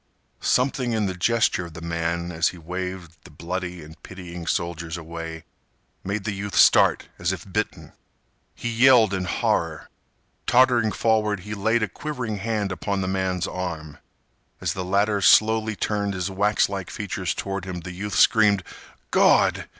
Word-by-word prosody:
Something 125 -1 +1
in 110 -2 +1
the 95 - -2
gesture 90 -1 +1
of 85 - -14
the - - -7
man 85 +1 -2
as 80 -1 +1
he 90 - -4
waved 90 -1 -6
the - - -14
bloody 90 -1 -5
and 80 +1 -14
pitying 90 -2 -9
soldiers 85 -1 -2
away 80 -1 -7 0.6
made 100 +1 -3
the 105 - -2
youth 100 +1 -5
start - - +5
as 85 +1 0
if 90 -3 -6
bitten. 105 0 -3 0.6
He - - -5
yelled 115 -3 +5
in 95 -1 -1
horror. - - -1 0.6
Tottering 120 -3 +4
forward 105 -1 +1
he 105 +3 -7
laid 110 +3 +1
a - - +1
quivering 120 -1 -5
hand 105 -1 -2
upon 100 +1 -2
the 95 - -2
man's 95 -1 -1
arm. 80 -5 -5 0.6
As - - -1
the 95 - -4
latter 100 +2 +1
slowly 110 +1 +4
turned 100 -1 -1
his 90 +1 -3
waxlike 100 -1 0
features - - -3
toward 95 -1 -4
him 90 -2 -5
the 90 - -7
youth 100 +3 -5
screamed: 105 -3 +4 0.5
"Gawd! - - +4
95 Hz, 160 wpm, -24 LUFS, 85-105 Hz, 0.6 s, start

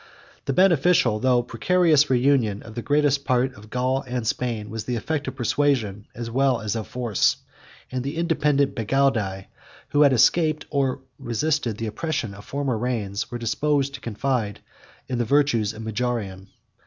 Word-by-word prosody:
The - - 0
beneficial, 170 - +4
though 125 0 +3
precarious, 150 +5 +3
reunion 125 -5 +2
of 110 - -11
the 120 - -4
greater 145 +5 +2
part 130 0 +1
of 105 -2 -14
Gaul 130 +2 0
and 125 -2 -3
Spain, 115 -2 -2
was 110 -1 -5
the 125 - -2
effect 145 +5 -2
of - - -4
persuasion, 120 -6 0
as 115 0 -5
well 130 -1 +2
as 110 0 -3
of 110 -2 -4
force; 120 -5 +1 0.6
47 - - -7
and 125 - -1
the 140 +4 -4
independent 150 -4 +1
Bagaudae, 115 -6 0 0.4
who 145 - +2
had 145 -2 +6
escaped, 155 +5 +3
or 135 -2 0 0.2
resisted, 120 -1 -1
the 115 - -3
oppression, 125 0 -3
of 100 +1 -12
former 135 -5 -2
reigns, 110 -4 -2
were 120 - -4
disposed 140 +4 0
to - - -8
confide 115 -2 -2 0.5
in 125 -2 -2
the - - +2
virtues 120 -4 +2
of 110 0 -9
Majorian. 110 -4 -3
125 Hz, 165 wpm, -24 LUFS, 110-140 Hz, 0.6 s, had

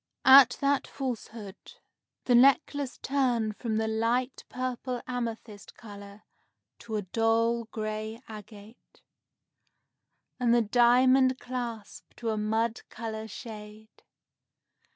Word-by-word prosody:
At 265 -2 +8
that 280 0 +1
falsehood, 225 -6 -7 0.5
the 250 - +2
necklace 275 +2 +3
turned 245 -6 0
from 225 -3 -2
the 220 0 0
light 235 +4 -1
purple 255 0 -4
amethyst 230 -4 -6
color 205 -1 -12 0.6
to 225 -2 -6
a 210 - -2
dull 230 +3 +1
gray 215 0 -5
agate, 215 +1 -13 1.4
and 240 -1 +3
the 240 - +4
diamond 255 +3 +4
clasp 235 -4 -7
to 230 -2 -3
a - - -1
mud 220 +2 -1
color 220 -1 -6
shade. 215 -1 -10
230 Hz, 105 wpm, -28 LUFS, 215-250 Hz, 1.4 s, At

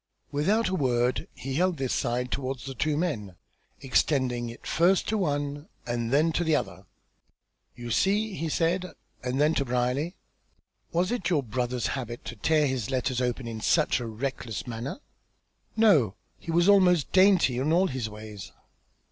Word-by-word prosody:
Without 195 +10 +1
a 185 - -2
word 125 -6 +1
he 135 +1 -5
held 180 +3 +1
this 130 -2 -1
side 125 0 -1
towards 130 -2 -3
the 135 - -5
two 145 +4 0
men, 115 - -2 0.5
extending 125 -3 +1
it 115 - -11
first 180 +3 +2
to 220 - 0
one, 145 -5 -2 0.2
and 120 -1 -2
then 155 +4 +3
to 175 - 0
the 160 -2 +2
other. - - -3 0.9
"You 120 -1 -7
see!" 205 - +1
he 165 -3 -3
said, 175 +3 0 0.3
and 125 +2 -1
then 150 +2 +4
to 140 - +1
Brierly. 125 +7 -1 0.8
"Was 180 +4 +1
it 215 -8 -1
your 155 -6 +2
brother's 125 +1 -2
habit 120 -3 -6
to 120 - -6
tear 150 +7 +2
his 130 -6 -2
letters 130 -1 -1
open 125 0 -2
in 110 -1 -5
such 155 +1 +2
a 120 - -4
reckless 115 -3 -4
manner?" 120 - -5 0.8
"No. 155 - +4 0.2
He - - -11
was 170 +2 +3
almost 180 -7 +4
dainty 185 -10 +4
in 145 +4 0
all 180 +3 +4
his 130 -9 -3
ways." 105 -1 -9
135 Hz, 165 wpm, -27 LUFS, 120-170 Hz, 0.9 s, then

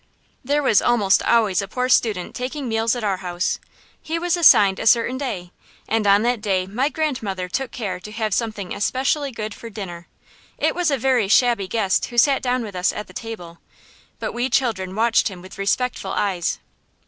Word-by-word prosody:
There 290 +3 +1
was 225 -6 +4
almost 210 -5 +3
always 215 -5 +2
a 200 - -5
poor 250 +5 -2
student 220 -7 +1
taking 260 +2 -4
meals 225 +1 +1
at 240 - -5
our 200 -3 0
house. 180 -1 -2 0.4
He 325 +1 -3
was 350 +1 0
assigned 205 - +6
a - - -1
certain 235 +2 +4
day, 195 -11 -4 0.4
and 220 -2 0
on 200 +2 +5
that 240 -2 0
day 190 -3 0
my 245 +9 -1
grandmother 230 -13 -2
took 265 +8 -3
care 205 -7 -4
to 210 +3 -10
have 215 -2 -2
something 215 -4 -2
especially 270 +6 0
good 215 -3 -5
for 230 - -10
dinner. 175 -5 -8 0.5
It - - +1
was 355 -2 0
a 280 - +1
very 250 -4 +2
shabby 230 -2 +3
guest 195 -2 +1
who 240 - -9
sat 270 +3 +4
down 250 -1 0
with 205 -4 -8
us 180 0 +1
at 210 - -8
table, 175 -7 -8 0.6
but - - -4
we 245 +2 -1
children 195 -9 0
watched 225 +1 +3
him 190 -4 -7
with 185 +2 -12
respectful 200 0 -1
eyes. 185 -4 -1
225 Hz, 190 wpm, -22 LUFS, 195-250 Hz, 0.6 s, assigned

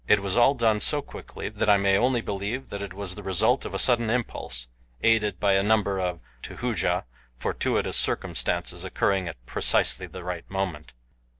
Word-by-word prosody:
It 105 - +5
was 100 -1 -1
all 120 +4 +5
done 110 -4 +2
so 145 +6 +1
quickly - - -8
that - - -1
I 100 - +7
may 100 0 +3
only 120 +3 +2
believe 105 +6 -4
that 100 - -5
it 100 -2 -5
was 95 -1 -3
the 105 - -8
result 95 -3 +2
of - - -3
sudden 120 -3 +3
impulse, 110 - -3 0.4
aided 105 -5 +3
by 100 -1 +3
a 95 - +4
number 100 -2 +2
of, 90 -2 -2 0.2
to - - -8
Hooja, - - 0 0.3
fortuitous - - -1
circumstances - - -1
occurring 95 -2 0
at 85 -5 -6
precisely - - +2
the 90 - -9
right 90 0 -5
moment. 95 -6 -4
100 Hz, 180 wpm, -26 LUFS, 95-110 Hz, 0.4 s, I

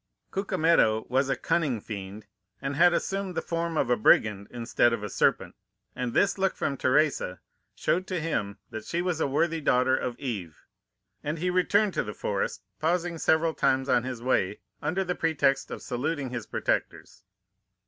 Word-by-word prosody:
"Cucumetto 165 - +2
was 130 +2 +2
a 135 - +2
cunning 135 -2 0
fiend, 100 0 -7 0.3
and 135 +1 -3
had 175 +4 +6
assumed 195 +1 -2
the - - +1
form 170 -1 -2
of 125 - +1
a - - +5
brigand 105 -2 +3
instead 120 0 +1
of 110 -3 -3
a 105 - -4
serpent, - - +1 0.4
and 125 -1 -2
this 200 0 +2
look 195 0 +1
from 140 - -1
Teresa 130 - +1 0.4
showed 185 +2 0
to 185 -2 -2
him 105 -11 -2
that 110 -1 -6
she 170 +1 -2
was 175 -3 -1
a - - +2
worthy 160 +4 0
daughter 130 -2 +3
of 125 -2 -3
Eve, 100 - -6 0.6
and 150 +3 -2
he 180 +3 0
returned 200 +3 +2
to - - 0
the 105 - -7
forest, 100 0 -2 0.2
pausing 170 +1 0
several 160 +1 +2
times 130 -2 +1
on 125 -2 +3
his 125 -1 -6
way, 105 -6 +1 0.2
under 185 +4 0
the 180 -1 -1
pretext 145 -5 +1
of - - -7
saluting 135 +1 -2
his 120 -3 -5
protectors. - - -2
140 Hz, 175 wpm, -27 LUFS, 120-170 Hz, 0.6 s, had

